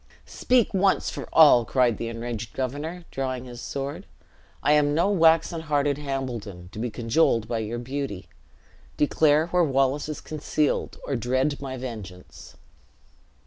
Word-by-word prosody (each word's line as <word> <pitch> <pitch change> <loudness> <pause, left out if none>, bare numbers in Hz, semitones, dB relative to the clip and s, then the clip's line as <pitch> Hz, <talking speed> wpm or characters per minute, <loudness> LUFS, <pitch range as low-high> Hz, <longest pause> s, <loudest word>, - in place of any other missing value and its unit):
"Speak 250 -3 +1
once 195 0 +2
for - - -7
all!" 145 -7 +7
cried 120 -2 +1
the 115 - -3
enraged 115 -1 -5
governor, 145 +7 -4
drawing 130 -2 -3
his 120 -1 -9
sword; 140 +1 -5 0.6
"I 145 - +3
am 145 -1 +3
no 170 +5 +2
waxen 165 -2 +3
hearted 145 -2 0
Hambledon, 120 -10 -5
to 105 - -8
be 120 +2 -2
cajoled 115 -1 +1
by 115 -1 -2
your 110 +2 -4
beauty. 125 -6 -5 0.7
Declare 150 +2 +3
where 180 0 +3
Wallace 135 0 +1
is 155 - -4
concealed, 150 -1 -2
or 140 - -2
dread 130 +4 0
my 130 -1 -5
vengeance." 110 -8 -9
135 Hz, 145 wpm, -25 LUFS, 120-150 Hz, 0.7 s, all